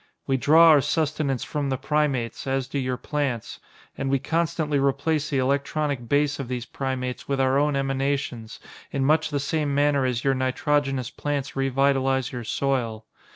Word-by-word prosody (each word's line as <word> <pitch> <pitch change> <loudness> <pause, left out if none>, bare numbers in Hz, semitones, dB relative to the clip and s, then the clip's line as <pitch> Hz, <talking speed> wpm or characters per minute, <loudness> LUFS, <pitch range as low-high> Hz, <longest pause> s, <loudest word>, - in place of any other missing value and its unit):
"We 135 - +1
draw 160 +5 +6
our 150 -3 +7
sustenance 145 -3 -1
from 145 -2 -3
the 130 - 0
primates, 140 -4 -1
as 135 -1 -1
do 140 - -3
your 130 -1 -2
plants, 135 -5 -3 0.4
and 135 - -3
we 135 - +3
constantly 155 -1 0
replace 140 +3 0
the 140 - 0
electronic 140 -1 -1
base 145 0 +2
of 135 - -4
these 125 -1 -4
primates 130 -1 -4
with 140 -1 -1
our 135 +1 +3
own 145 0 +1
emanations, 135 -4 -2 0.3
in 135 -1 0
much 155 +3 +3
the 145 -2 -1
same 145 0 -1
manner 145 -1 +3
as 125 -2 -1
your 135 - +3
nitrogenous 130 0 0
plants 145 -2 -3
revitalize 135 -1 +1
your 125 -2 -5
soil. 115 -3 -1
135 Hz, 165 wpm, -25 LUFS, 130-145 Hz, 0.4 s, our